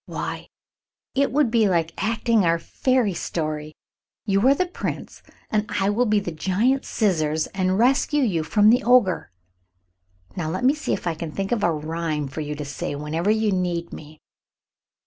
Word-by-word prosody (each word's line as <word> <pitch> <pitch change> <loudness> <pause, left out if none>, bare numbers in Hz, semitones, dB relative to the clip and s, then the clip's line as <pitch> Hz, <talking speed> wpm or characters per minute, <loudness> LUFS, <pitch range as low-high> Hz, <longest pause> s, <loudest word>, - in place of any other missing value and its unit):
"Why, - - -5 0.7
it 280 +1 +1
would 280 -4 +2
be 225 -3 +3
like 165 -2 0
acting 225 -1 +2
our 165 -1 +3
fairy 245 +4 0
story. 155 -2 -4 0.5
You 200 +3 +2
are 275 - +6
the 365 - +1
Prince, 355 - -6 0.3
and 215 0 0
I 195 +1 +2
will 240 +4 +1
be 210 -1 +3
the 185 -4 -5
giant 210 +11 0
scissors 155 -7 0
and 185 -1 0
rescue 275 +5 +3
you 185 -9 +1
from 205 +7 +4
the 245 - +3
Ogre. 240 -7 +3 1.1
Now 160 -4 -3
let 185 +8 -3
me 265 +3 +5
see 305 - -3
if - - -4
I 170 - 0
can 160 0 -6
think 195 +4 -4
of 235 -4 0
a 170 - +3
rhyme 155 -1 -3
for 135 +4 -6
you 150 0 -4
to 150 0 -6
say 145 0 -4
whenever 155 +6 -2
you 220 0 +2
need 175 -2 -2
me." 155 0 -11
190 Hz, 180 wpm, -23 LUFS, 160-230 Hz, 1.1 s, are